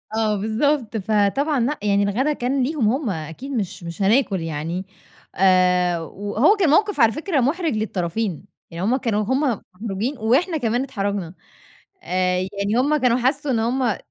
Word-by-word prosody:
آه، 220 -1 +1
بالضبط. 225 +3 0
فطبعًا 220 +8 +1
لأ، 270 +6 -1
يعني 200 -1 +2
الغدا 250 +9 +1
كان 260 0 -1
ليهم 260 -5 +1
هُم 260 +1 -1
أكيد 165 - -6
مش 200 -8 -3
مش 170 +2 -7
هناكل 200 -2 +2
يعني، 165 +3 -4 0.5
آآ، 180 -2 +3
وهو 205 - +1
كان 375 -7 +2
موقف 405 +3 +2
على 230 -2 +6
فكرة 310 - -1
مُحرِج 310 +5 0
للطرفين، 190 -2 -2 0.3
يعني 170 +2 -5
هُم 235 +6 +2
كانوا 225 -6 0
هُم 260 +6 0 0.4
مُحرَجين 225 +6 -3
وإحنا 265 - +1
كمان 240 -2 0
اتحرجنا. 200 -8 -3 0.7
آآ، 185 0 0
يعني 200 +3 -2
هُم 295 +4 +2
كانوا 250 -4 +2
حسّوا 270 +3 0
إن 235 - +1
هُم 240 0 0
220 Hz, 155 wpm, -22 LUFS, 195-270 Hz, 0.7 s, على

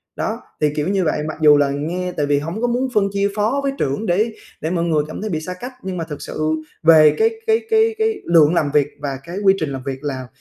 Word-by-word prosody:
Đó, - - -3 0.2
thì, 150 - +3
kiểu 150 +2 -1
như 195 -1 +1
vậy, 155 -2 0
mặc 155 - -5
dù 150 -1 +7
là 145 -1 +2
nghe 175 +6 -3
tại 150 -4 -1
vì 145 0 +2
hổng 165 +9 -5
có 245 - +2
muốn 250 +2 0
phân 200 -2 +3
chia 200 0 +1
phó 220 +6 +1
với 275 - 0
trưởng 145 - -1
để 215 +6 +1 0.3
để 160 - -2
mọi 170 -2 0
người 160 -3 +1
cảm 155 - -7
thấy 215 - -3
bị 160 -3 -2
xa 180 +3 -5
cách, 245 +8 -8
nhưng 185 -1 -4
mà 165 - -2
thực 150 -3 -7
sự 155 0 -3 0.3
về 155 -2 +7
cái 445 +1 +5 0.2
cái 445 +1 +3
cái 445 0 +3
cái 440 -1 0
lượng 165 -2 +5
làm 150 -4 +1
việc 145 -1 +3
và 140 -2 -3
cái 175 +3 -7
quy 195 - +6
trình 155 - -2
làm 135 -2 -5
việc 135 0 -5
là 130 -3 -4
170 Hz, 270 wpm, -20 LUFS, 150-210 Hz, 0.3 s, dù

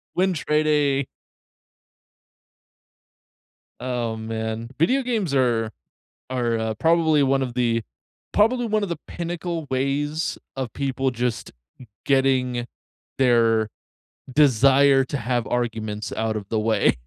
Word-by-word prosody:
Win-trading. 150 -6 +1 2.8
Oh, 120 -3 -2
man. 110 +1 -4
Video 255 - +3
games 220 - -1
are 120 -4 +2 0.6
are, 120 -3 0
uh, 110 0 -2
probably 160 +2 +3
one 135 0 +2
of 125 -2 -3
the 115 -2 +1 0.5
probably 240 +3 +3
one 215 -1 0
of 200 - -1
the 170 - -3
pinnacle 170 -1 -4
ways 145 +4 -1 0.2
of 130 -4 -4
people 135 -1 -1
just 120 -1 -3 0.5
getting 130 -3 +2 0.5
their 115 -4 +3 0.6
desire 135 0 +5
to 140 - -3
have 120 -1 -1
arguments 110 -3 -3
out 110 0 -1
of 100 -2 -7
the 110 - 0
way. 110 -1 +3
130 Hz, 110 wpm, -23 LUFS, 115-150 Hz, 2.8 s, desire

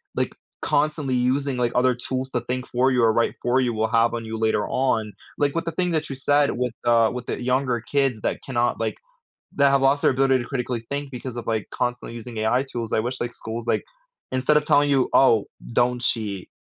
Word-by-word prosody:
like, - - -1 0.3
constantly 150 -3 0
using, 130 +2 0
like, 120 -1 +1
other 125 0 +3
tools 130 +1 -4
to 125 - -1
think 125 +1 -3
for 130 +2 +2
you, 125 -2 +2
or 115 - +5
write 115 - +1
for 125 +2 +2
you 120 -2 0
will 110 0 0
have 115 +1 +2
on 115 - -4
you 110 0 -5
later 110 -2 +1
on, 110 -6 0 0.3
like, 145 +1 +1
with 165 - -1
the 165 - -2
thing 180 +2 -1
that 155 -3 -1
you 135 - -4
said 145 +2 +2
with 125 -1 -2
the 115 -1 +4
with 125 -1 -5
the - - -3
younger 125 -2 0
kids 135 -3 0
that - - -1
cannot, 120 -2 0
like - - -1 0.6
that 140 -1 +5
have 135 -1 +3
lost 140 +1 +3
their - - +4
ability 135 0 +3
to 120 - -3
critically 125 -3 -3
think 140 0 -4
because 125 -1 -6
of, 120 - -6
like, 110 -2 -1
constantly 125 -1 -3
using 115 0 -8
AI 125 +5 +1
tools. 115 -2 -4
I - - +3
wish, 125 +2 -4
like, 120 0 -3
schools, 115 +1 -6
like, - - +1 0.5
instead 130 +4 +2
of 150 - 0
telling 145 0 +4
you, 135 -2 +3
"Oh, 115 -6 +5 0.3
don't 125 0 +2
cheat," 105 -6 -1
125 Hz, 225 wpm, -23 LUFS, 115-135 Hz, 0.6 s, or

